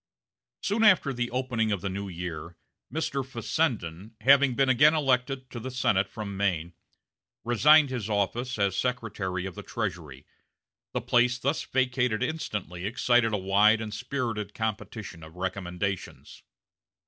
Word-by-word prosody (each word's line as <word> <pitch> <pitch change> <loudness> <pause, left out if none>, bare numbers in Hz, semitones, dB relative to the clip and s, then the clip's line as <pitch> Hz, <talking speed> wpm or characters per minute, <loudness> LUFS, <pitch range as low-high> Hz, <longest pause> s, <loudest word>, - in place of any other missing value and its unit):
Soon 215 +3 +1
after 185 -10 +5
the 120 -1 -2
opening 125 -3 -1
of 100 -4 -1
the 100 - -3
new 100 +1 -4
year, 85 -1 -6 0.3
Mr. 140 -3 -2
Fessenden, 115 - -2
having 135 +1 +5
been 135 +1 +3
again 145 +5 +5
elected 130 -2 0
to 120 - -6
the 125 +3 -5
Senate 100 -6 +1
from 100 -1 -6
Maine, 90 -4 -1 0.7
resigned 140 +5 +5
his 115 -5 -3
office 115 +5 -1
as 100 -2 +1
Secretary 100 -6 -2
of 95 - -5
the - - -8
Treasury. 75 -6 -5 0.7
The - - -1
place 125 0 +3
thus 140 +5 -1
vacated 125 -3 0
instantly 105 - -4
excited 120 0 +2
a 105 - +1
wide 100 +3 +4
and 110 -2 -5
spirited 115 -4 -3
competition 110 -4 -4
of 80 +1 -12
recommendations. 95 +1 -4
110 Hz, 140 wpm, -27 LUFS, 95-130 Hz, 0.7 s, after